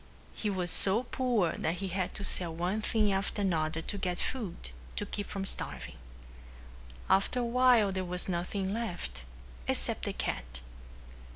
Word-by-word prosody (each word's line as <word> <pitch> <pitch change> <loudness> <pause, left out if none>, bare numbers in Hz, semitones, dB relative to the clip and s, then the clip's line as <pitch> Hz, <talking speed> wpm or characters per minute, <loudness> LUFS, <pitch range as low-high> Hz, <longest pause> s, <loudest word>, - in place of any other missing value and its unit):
He 215 - -2
was 185 -3 +2
so 205 +5 +6
poor 240 -8 0
that 165 - -2
he 195 +1 -4
had 185 0 -2
to - - -5
sell 175 -4 +5
one 180 +6 -1
thing 215 -1 +1
after 195 +1 -1
another 165 -3 0
to 200 - -4
get 180 -2 -2
food 200 - -5 0.2
to - - -2
keep 205 - -5
from 195 -1 -4
starving. - - 0 1.1
After 195 +6 +2
a - - 0
while 240 -4 +4
there 190 0 -2
was 180 0 -3
nothing 190 +2 -2
left 175 - -4 0.5
except - - -1
the - - -2
cat. 60 +1 -4
190 Hz, 160 wpm, -31 LUFS, 175-210 Hz, 1.1 s, so